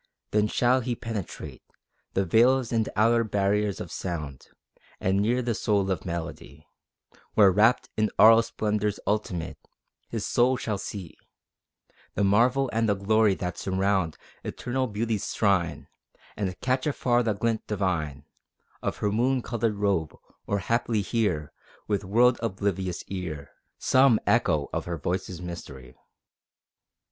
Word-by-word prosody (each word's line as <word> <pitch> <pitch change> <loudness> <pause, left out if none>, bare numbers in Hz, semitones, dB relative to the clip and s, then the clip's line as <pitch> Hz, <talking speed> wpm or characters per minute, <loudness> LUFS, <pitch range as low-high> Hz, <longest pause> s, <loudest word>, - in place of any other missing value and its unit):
Then 105 0 +3
shall 125 +4 +2
he 120 -1 -2
penetrate 110 -5 -6 0.5
The 95 - +2
veils 120 +6 +3
and 115 -2 +1
outer 115 +2 +4
barriers 105 -1 0
of 90 - -7
sound, 75 -7 -5 0.5
And 95 +1 +1
near 120 +5 +1
the 120 -1 0
soul 100 -3 0
of 95 - -3
melody, 80 -3 -6 0.7
Where, 100 -3 +7
rapt 110 +6 +3
in 110 0 +1
aural 115 +1 +8
splendors 105 -2 -2
ultimate, 100 -6 -2 0.5
His - - -3
soul 125 +2 +2
shall 105 -4 -3
see 95 -5 -7 1.0
The 100 - +1
marvel 120 +7 +3
and 115 0 +1
the 100 - +3
glory 105 +1 +3
that 90 -1 -4
surround 95 -3 0 0.3
Eternal 130 +1 -2
Beauty's 110 -1 -2
shrine; 85 -7 +1 0.5
And 95 -3 -3
catch 130 +2 0
afar 125 -4 +2
the 115 -3 0
glint 110 +2 -2
divine 85 -9 -2 0.6
Of - - -2
her 105 - 0
moon 125 +3 +1
colored 115 -2 -1
robe, 100 -7 0 0.3
or 100 - 0
haply 115 +1 0
hear, 95 -8 -1 0.3
With 105 -1 0
world 120 +6 +3
oblivious 95 -4 -2
ear, 80 -8 -6 0.3
Some 130 -3 +4
echo 80 -11 +2
of - - -2
her 85 -1 -3
voice's 90 +3 -3
mystery. 70 -8 -9
105 Hz, 135 wpm, -26 LUFS, 90-115 Hz, 1.0 s, aural